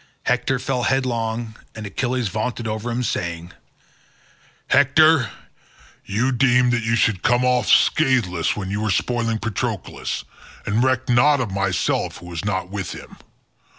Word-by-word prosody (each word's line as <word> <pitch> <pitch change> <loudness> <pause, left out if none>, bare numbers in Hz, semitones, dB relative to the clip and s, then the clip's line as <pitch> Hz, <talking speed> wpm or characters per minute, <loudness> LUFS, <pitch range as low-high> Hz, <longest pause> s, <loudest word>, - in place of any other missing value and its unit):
Hector 125 +1 +1
fell 125 0 -2
headlong, 115 -3 -1 0.2
and 110 -1 -7
Achilles 125 +3 -2
vaunted 115 +2 -3
over 110 +2 -3
him 120 +1 -2
saying, 85 -5 -3 1.2
"Hector, 140 -1 +5 0.7
you 110 +6 0
deemed 125 -1 +3
that 120 - +1
you 115 +1 0
should 110 -5 +1
come 120 +3 +2
off 125 -1 +2
scatheless 115 - +3
when 95 -2 -5
you 105 +1 -2
were 110 - -1
spoiling 115 +4 0
Patroclus, 110 -3 -4 0.4
and 110 +4 +1
recked 130 -1 +1
not 140 +4 +4
of 120 -6 -2
myself 100 -1 -1
who 90 - -13
was 85 0 -6
not 95 -2 -2
with 100 -2 -4
him. - - -11
115 Hz, 145 wpm, -21 LUFS, 105-125 Hz, 1.2 s, Hector